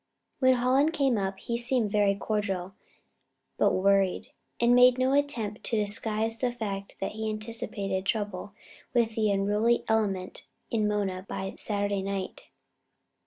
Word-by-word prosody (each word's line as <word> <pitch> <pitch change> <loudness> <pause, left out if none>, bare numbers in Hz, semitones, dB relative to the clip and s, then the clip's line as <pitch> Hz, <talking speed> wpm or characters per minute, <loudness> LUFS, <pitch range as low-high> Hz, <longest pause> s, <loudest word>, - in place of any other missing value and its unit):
When 260 -1 +5
Hallen 255 +4 +3
came 275 -6 +1
up, 195 0 -2
he 235 - -4
seemed 240 -3 +1
very 205 -1 +3
cordial, 195 -3 -2 0.9
but - - +4
worried, 195 0 +2 0.3
and 235 +1 +4
made 250 0 +6
no 260 +1 +2
attempt 245 -7 -1
to 230 - 0
disguise 215 +2 0
the 250 -1 +1
fact 200 -4 -5
that 195 - -2
he 220 0 -3
anticipated 215 -3 -2
trouble 205 -2 -2 0.4
with 230 -2 +2
the 215 -1 +1
unruly 205 +4 +2
element 200 -4 -1 0.2
in 215 -2 +1
Mona 195 -3 -1
by 190 0 -4
Saturday 205 -1 -1
night. 195 -1 -4
210 Hz, 140 wpm, -28 LUFS, 195-235 Hz, 0.9 s, made